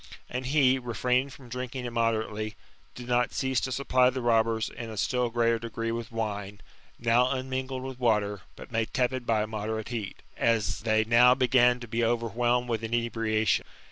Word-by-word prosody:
And 125 +1 -3
he, 135 -2 +4
refraining 125 +2 0
from 130 -1 -13
drinking 125 +1 -5
immodetately, 110 -2 -1 0.4
did 125 -1 -9
not 125 0 +1
cease 130 -2 0
to 130 - -3
supply 130 -1 +3
the 130 -1 -4
robbers 115 -1 +2
in 115 -2 -7
a - - -7
stiU 125 +3 0
greater 115 -1 +2
degree 115 0 -4
with 115 +1 -5
wine, 105 -3 -4 0.4
now 120 +2 +3
unmingled 130 0 -3
with 130 -1 -7
water, 105 -5 +1
but - - -12
made 115 -1 -2
tepid 130 -1 0
by 110 -2 +2
a - - -2
moderate 110 0 -4
heat, 110 -5 -5
as 115 -2 +1
they 110 -1 +2
now 120 +2 +6
began 125 -1 +4
to 120 - -7
be 115 +1 -1
overwhelmed 120 +1 +1
with 115 -2 -1
inebriation. 115 -1 0
120 Hz, 175 wpm, -28 LUFS, 110-125 Hz, 0.4 s, now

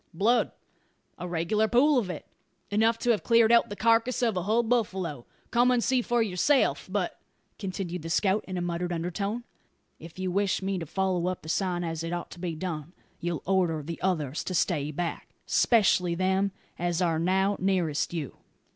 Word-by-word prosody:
"Blood, 230 +7 +3 0.7
a 180 - -4
regular 175 +6 +1
pool 260 +4 +4
of 200 -6 -3
it 180 - -6 0.5
enough 225 +2 +3
to 240 +1 +1
have 220 - +1
cleared 230 -1 +4
out 235 - +5
the 205 - -5
carcass 230 +3 +2
of 225 -4 +2
a 180 - 0
hull 220 +6 +2
buffalo. 190 - -1 0.2
Come 245 +1 +4
and 245 -2 +2
see 260 -1 +2
for 240 -1 +1
yourself. 220 +8 +2
But," - - -2 0.4
continued 185 -3 -4
the 165 - -6
scout 195 +4 +2
in 185 -1 -4
a - - -1
muttered 175 0 -2
undertone, 195 +7 -2 0.6
"if 165 +2 -12
you 185 -1 -2
wish 195 0 0
me 190 -1 -1
to 165 - -6
follow 185 0 0
up 185 -3 -3
the 155 - -8
sign 180 0 0
as 165 -1 -3
it 165 +1 -3
ought 175 0 -4
to 175 - -10
be 170 -2 -3
done, 160 -1 -5 0.3
you'll 170 -2 -3
order 175 -5 +1
the 165 +3 -6
others 155 -7 -1
to 185 - -3
stay 150 -2 +1
back 165 +3 -4
'specially 185 -6 +3
them 190 +2 +1 0.3
as 175 0 0
are 165 -3 +1
now 190 +4 +2
nearest 180 -6 0
you." 160 -6 -5
185 Hz, 190 wpm, -28 LUFS, 170-220 Hz, 0.7 s, out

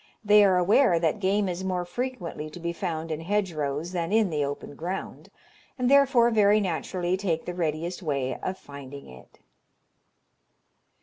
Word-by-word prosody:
They 210 0 +7
are 190 -2 +4
aware 185 +2 +4
that 165 +5 0
game 200 +1 +1
is 180 +1 -4
more 180 -2 -2
frequently 175 -7 -5
to 165 - -10
be 170 0 -3
found 165 -2 -4
in 155 0 -3
hedgerows 165 -5 -2
than 175 -1 -2
in 215 -4 +3
the 150 -2 0
open 145 0 -5
ground, 175 +6 -6 0.5
and 250 0 +1
therefore 265 -4 +5
very 210 -1 +4
naturally 180 -1 -1
take 180 -4 -2
the 180 - -4
readiest 170 +1 -3
way 140 -6 -2
of 185 0 -4
finding 140 -4 -10
it. 65 -1 -15
180 Hz, 160 wpm, -26 LUFS, 160-200 Hz, 0.5 s, They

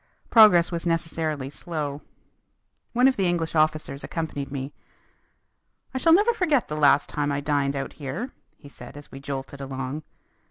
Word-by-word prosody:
Progress 205 -7 +7
was 170 0 -3
necessarily 160 -4 -2
slow. 150 -3 -4 0.9
One 250 +2 +5
of 265 - +2
the 190 -2 +2
English 170 -2 -1
officers 155 -3 0
accompanied 150 -4 -4
me. 140 0 -5 1.2
"I 260 - -2
shall 330 - +4
never 415 +8 +5
forget 315 - +1
the 150 - -3
last 145 -1 +4
time 145 -1 -1
I 140 - -1
dined 145 -1 0
out 135 0 -4
here," 150 - -5 0.3
he - - -14
said 130 -1 -12
as 145 - -11
we 135 - -9
jolted 140 0 -6
along. 135 +2 -4
150 Hz, 160 wpm, -25 LUFS, 140-175 Hz, 1.2 s, Progress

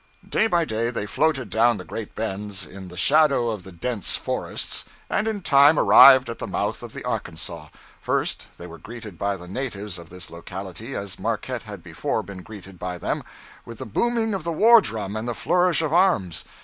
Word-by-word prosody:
Day 220 - +2
by 175 -5 +2
day 115 -2 -1
they 115 -4 -3
floated 135 - 0
down 115 +2 +3
the - - -7
great 110 -3 -7
bends, 105 -2 -3
in 95 -1 -10
the 90 0 -11
shadow 140 - +3
of 105 -3 -5
the 95 - -12
dense 100 +4 -1
forests, - - -3 0.3
and 215 - +1
in 210 -4 -3
time 145 +1 +6
arrived 130 -1 +8
at 115 - -6
the - - -4
mouth - - -2
of - - -9
the - - -7
Arkansas. 85 -1 -5 0.3
First, - - -1
they 85 - -9
were 85 -2 -10
greeted 110 -3 -10
by 100 -1 -1
the 90 -1 -11
natives 105 -4 -5
of 85 -1 -12
this 90 -1 -8
locality 95 +8 -7
as 100 -1 -5
Marquette - - -2
had - - -8
before - - -2
been 100 -2 -9
greeted 95 -3 -12
by 90 0 -4
them - - -3 0.4
with 115 -1 -10
the - - -6
booming 225 - 0
of 190 -4 -3
the 170 - -2
war 225 +7 +7
drum 105 - -3
and 110 +2 -3
the 120 - -2
flourish 180 -2 +2
of 155 -1 -1
arms. 130 - +2
110 Hz, 200 wpm, -24 LUFS, 95-145 Hz, 0.4 s, arrived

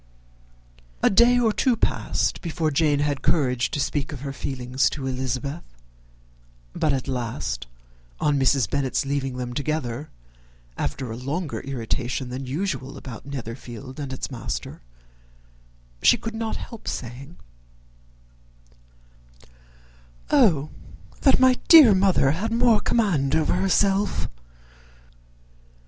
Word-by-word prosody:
A - - +5
day 240 +5 +5
or 225 -3 +2
two 255 +1 +2
passed - - -1
before 160 -2 -1
Jane 145 -1 +2
had 145 -2 -1
courage 125 -6 +1
to - - -3
speak 145 0 -1
of 140 -4 -7
her 140 -1 -5
feelings 130 0 -1
to 140 -3 -6
Elizabeth; 130 +4 -3 1.1
but 155 - +1
at 135 -2 -2
last, 115 - -3 0.5
on 145 -2 +2
Mrs. 135 -3 +3
Bennet's 135 0 -1
leaving 135 -2 -2
them 125 -1 -4
together, 145 -1 -3 0.7
after 110 - -3
a - - -4
longer 145 +7 -3
irritation 125 0 -3
than 130 +1 -5
usual 140 -3 -3
about 130 -1 -9
Netherfield 125 -1 -7
and 140 -2 -5
its 130 - -5
master, 120 -3 -5 1.2
she - - +6
could 225 - -6
not 225 0 -3
help 230 -3 -9
saying, 130 +7 -6 2.9
"O 150 -3 +4 0.5
that 270 - +5
my 255 -1 +5
dear 300 -10 +9
mother 185 -8 +3
had 200 +9 -2
more 230 -2 +4
command 170 - +1
over 160 -1 +2
herself! 195 +2 +1
140 Hz, 120 wpm, -24 LUFS, 130-180 Hz, 2.9 s, dear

